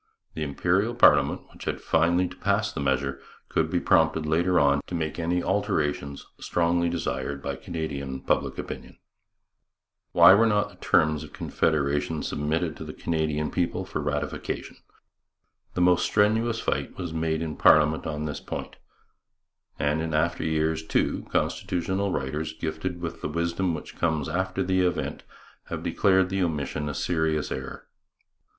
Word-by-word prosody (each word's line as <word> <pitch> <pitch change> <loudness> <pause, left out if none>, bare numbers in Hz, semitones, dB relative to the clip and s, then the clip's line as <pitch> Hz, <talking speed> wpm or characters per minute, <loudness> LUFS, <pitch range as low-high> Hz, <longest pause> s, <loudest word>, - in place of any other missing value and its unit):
The 80 - -6
Imperial 90 - +1
parliament, 70 - +5
which - - -11
was - - -1
finally 85 +3 +2
to 90 - -11
pass 100 +2 0
the - - -4
measure, 70 0 0 0.3
could - - +1
be - - +1
prompted 80 -1 +3
later 85 +4 +2
on 70 0 +3
to 90 - -4
make 80 0 -3
any 85 +1 0
alterations 75 -8 -1
strongly 85 0 +1
desired 75 -4 -3
by - - -4
Canadian 70 -5 -5
public - - 0
opinion. - - -7 1.1
Why - - +8
were 115 +3 +5
not 105 -2 +2
the - - -18
terms 75 0 +2
of 75 - -11
Confederation 75 0 0
submitted 80 +3 -1
to - - -7
the - - -8
Canadian 75 -2 -1
people 90 +1 -1
for 95 -5 -4
ratification? 75 0 -3 1.0
The 90 - 0
most 90 0 +4
strenuous 110 +3 +2
fight - - -2
was 90 -3 -4
made 80 0 -1
in 80 -2 -4
parliament 75 0 +4
on 75 -1 -3
this 75 -1 -4
point, - - -6 1.0
and 75 +2 0
in 80 -1 -2
after 85 +2 +1
years, 80 0 0
too, 80 - 0
constitutional 95 +3 -1
writers, 75 +2 -2
gifted 80 +3 -4
with 85 -2 -5
the - - -3
wisdom 85 +2 -1
which 75 - -9
comes 80 -4 0
after 95 +3 -1
the 95 0 +2
event, 90 -1 -1 0.4
have - - -5
declared 95 -2 +3
the 95 +1 -1
omission 75 -3 -2
a 75 - -4
serious 80 -3 0
error. 65 0 -6
80 Hz, 155 wpm, -26 LUFS, 75-90 Hz, 1.1 s, Why